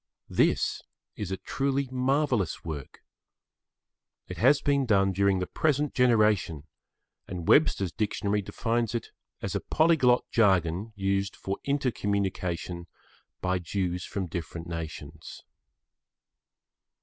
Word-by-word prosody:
This - - +2 0.3
is 105 -3 -4
a 95 - -2
truly 135 +7 -1
marvellous 130 - 0
work. 75 -5 -7 1.2
It - - -7
has 135 +5 +5
been 140 -2 +1
done 95 -3 +3
during 100 +1 +2
the 90 - -1
present 150 - 0
generation, 105 - +3 0.6
and 85 -3 -6
Webster's 95 -4 +4
Dictionary 105 0 -1
defines 115 +3 -1
it 115 - -3 0.3
as - - -2
a - - 0
polyglot 155 -6 +3
jargon 95 -1 +2
used 100 0 -1
for 95 +1 -4
inter 140 -2 +1
communication 90 -4 -2 0.5
by 90 0 0
Jews 90 0 -2
from 100 -2 -3
different 85 0 -6
nations. 80 -2 -7
100 Hz, 115 wpm, -28 LUFS, 90-125 Hz, 1.2 s, has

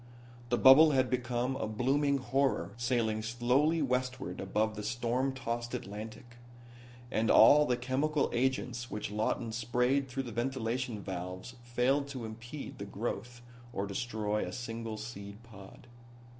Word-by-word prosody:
The 120 - +2
bubble 145 +5 +8
had 130 -1 +2
become 125 +1 -1
a 135 - -2
blooming 140 +6 +1
horror 135 +1 0
sailing 115 -2 0
slowly 125 +8 +2
westward 125 -7 -2
above 105 +3 0
the 105 - -5
storm 120 +4 -1
tossed 120 -2 -4
Atlantic. 110 +2 -8 0.7
And 110 0 +1
all 150 +6 +7
the 125 - +1
chemical 135 +4 0
agents 125 0 -1
which 105 -1 -4
Lawton 110 +2 -1
sprayed 125 +4 +1
through 135 +2 -3
the 120 - -7
ventilation 120 -2 -2
valves 90 +4 -6
failed 125 +4 +1
to 130 -4 -6
impede 120 +6 -8
the - - -4
growth 120 +3 -5 0.3
or 100 -3 -2
destroy 105 0 -2
a - - -4
single 115 -2 -5
seed 105 -1 -8
pod. 100 -2 -13
120 Hz, 140 wpm, -32 LUFS, 110-130 Hz, 0.7 s, bubble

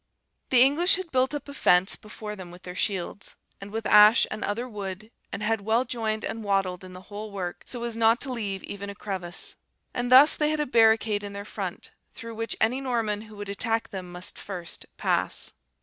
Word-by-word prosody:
"The 250 -1 +7
English 310 +7 +4
had 375 -3 -6
built 260 +2 +2
up 290 - -6
a 285 - -8
fence 180 -8 +4
before 210 0 -8
them 185 -3 -9
with 175 +1 -13
their 180 - -7
shields, 190 +1 -3 0.3
and 195 - -8
with 220 +1 -4
ash 210 +2 +7
and 215 - -4
other 230 +5 -2
wood; 205 -1 -6 0.2
and 210 - -4
had 220 0 +1
well 225 +5 +1
joined 220 -3 -2
and 225 0 -4
wattled 195 -3 0
in 185 0 -10
the 185 +1 -11
whole 205 +2 -7
work, 185 -3 -5
so 240 -2 -6
as 235 -1 -3
not 230 +1 +4
to 265 -3 -2
leave 200 -5 -3
even 200 0 -6
a 200 - -7
crevice; 190 -4 -4 0.4
and 245 0 -2
thus 270 +4 +8
they 300 -1 +1
had 310 0 -1
a 300 - +1
barricade 220 -3 +4
in 205 -1 -7
their 200 0 -6
front, - - -5 0.2
through 230 -2 -8
which 225 0 -3
any 245 +5 +2
Norman 230 -5 -1
who 215 -1 -12
would 205 0 -7
attack 225 +3 0
them 185 -2 -7
must 180 +1 -6
first 180 -4 -6
pass. - - +1
215 Hz, 210 wpm, -26 LUFS, 200-235 Hz, 0.4 s, thus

